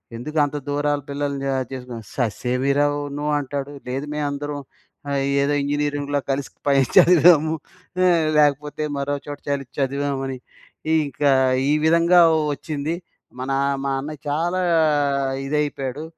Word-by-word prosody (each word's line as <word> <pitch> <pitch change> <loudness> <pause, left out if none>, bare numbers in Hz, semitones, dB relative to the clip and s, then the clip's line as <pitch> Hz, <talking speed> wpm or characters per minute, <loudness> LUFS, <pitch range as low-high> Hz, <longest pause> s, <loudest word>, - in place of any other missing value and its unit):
ఎందుకు 150 +7 -6
అంత 145 +1 -4
దూరాల 145 0 0
పిల్లని 140 -1 -3
ఆహ్, 130 -1 -1
చేసుకో 125 -2 -7 0.2
ససే‌మి‌రా 125 +4 0 0.3
నో 145 - -3
అంటాడు. 140 0 -4 0.2
లేదు 135 +3 -3
మేమందరం 145 0 -3 0.5
ఆహ్, 140 -1 0 0.2
ఏదో 140 +1 +1
ఇంజినీరింగులో 145 0 -1
కలిసి 135 0 -2 0.2
పైన 140 -1 +4
చదివాము. 160 -2 +6 0.5
ఆ - - +5 0.3
లేకపోతే 150 +1 +1
మరోచోట 145 +1 -3
చలి 140 -1 -1
చదివామని. 135 -1 -1 0.5
ఈ - - +3
ఇంకా 140 +1 +1 0.4
ఈ - - +3
విధంగా 170 +2 +5 0.3
వచ్చింది. 150 +2 -3 0.4
మన 130 +2 -3 0.3
మా 140 - 0
అన్న 150 +3 -6 0.2
చాలా 170 +5 0 0.8
ఇదైపోయాడు. 145 -1 -2
145 Hz, 120 wpm, -22 LUFS, 135-150 Hz, 0.8 s, చదివాము